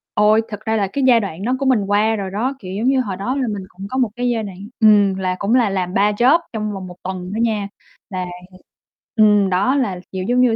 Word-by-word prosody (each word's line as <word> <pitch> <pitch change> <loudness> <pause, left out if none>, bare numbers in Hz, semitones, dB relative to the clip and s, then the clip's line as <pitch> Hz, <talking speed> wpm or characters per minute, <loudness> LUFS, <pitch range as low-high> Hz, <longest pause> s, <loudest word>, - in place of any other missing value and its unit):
Ôi, 215 +1 +4
thực 210 -2 -6
ra 220 0 0
là 205 -3 +1
cái 280 - 0
giai 240 -2 +6
đoạn 195 -4 -5
đó 250 +4 +1
của 275 - -1
mình 255 -6 +3
qua 210 +2 +2
rồi 195 -3 -4
đó, 235 +7 -1
kiểu 185 -4 -8
giống 220 +5 -1
như, 265 0 +3
hồi 200 -6 -4
đó 240 +7 -2
là 265 -3 -1
mình 205 -3 -4
cũng 195 +2 -9
có 260 - -3
một 250 -4 +2
cái 245 0 -1
giai 230 -2 -1
đoạn 195 -3 -8 0.2
ừm, 205 -3 +5
là 185 -1 -1
cũng 210 +5 +1
là 240 -5 +3
làm 185 -2 -2
3 205 +2 +3
job 245 +10 +4
trong 215 -1 -3
vòng 190 -2 -6
1 180 - -10
tuần 185 0 -5
đó - - -3
nha, 215 -3 0 0.4
là 185 -3 -3 0.9
ừm, 210 -2 +5
ừm, 195 - +1
đó 195 +9 +2
là, 210 -10 -1
kiểu 185 -1 -4
giống 250 +1 +3
như, 245 -3 +3
210 Hz, 265 wpm, -19 LUFS, 195-240 Hz, 0.9 s, giai